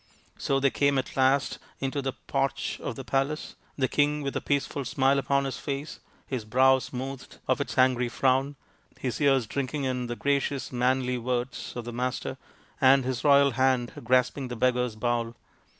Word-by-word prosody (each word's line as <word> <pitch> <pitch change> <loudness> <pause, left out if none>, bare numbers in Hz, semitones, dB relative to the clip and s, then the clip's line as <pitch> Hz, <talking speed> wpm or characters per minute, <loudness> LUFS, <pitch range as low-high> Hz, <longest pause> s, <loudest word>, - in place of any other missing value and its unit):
So 135 - 0
they 135 -1 +2
came 140 -1 +2
at 130 - -3
last 135 +1 +2 0.2
into 135 +1 -2
the 135 -1 -2
porch - - -2
of - - -4
the - - -7
palace, 140 +3 -1 0.2
the 130 -2 +2
king 145 +1 +1
with 140 - -3
a - - -1
peaceful 140 0 -1
smile 135 +3 +2
upon 140 0 +1
his 135 - -4
face, 140 +1 -5 0.3
his 130 -5 -3
brow 130 +4 +4
smoothed 130 +1 -7
of - - +1
its - - -4
angry 130 -1 +3
frown, 135 +4 +1 0.4
his 130 +3 -3
ears 135 -4 +4
drinking 140 +5 -3
in 125 -2 -1
the 120 - -3
gracious 140 0 -1
manly 125 0 +1
words 125 +1 -3
of 120 -1 -5
the 120 - -6
Master, 125 +1 -3 0.4
and 130 0 +6
his 130 -2 -2
royal 140 -1 +6
hand 130 -1 +1
grasping 130 +2 +2
the 120 - -5
beggar's 125 -1 +1
bowl. 120 +1 -1
130 Hz, 175 wpm, -27 LUFS, 125-140 Hz, 0.4 s, and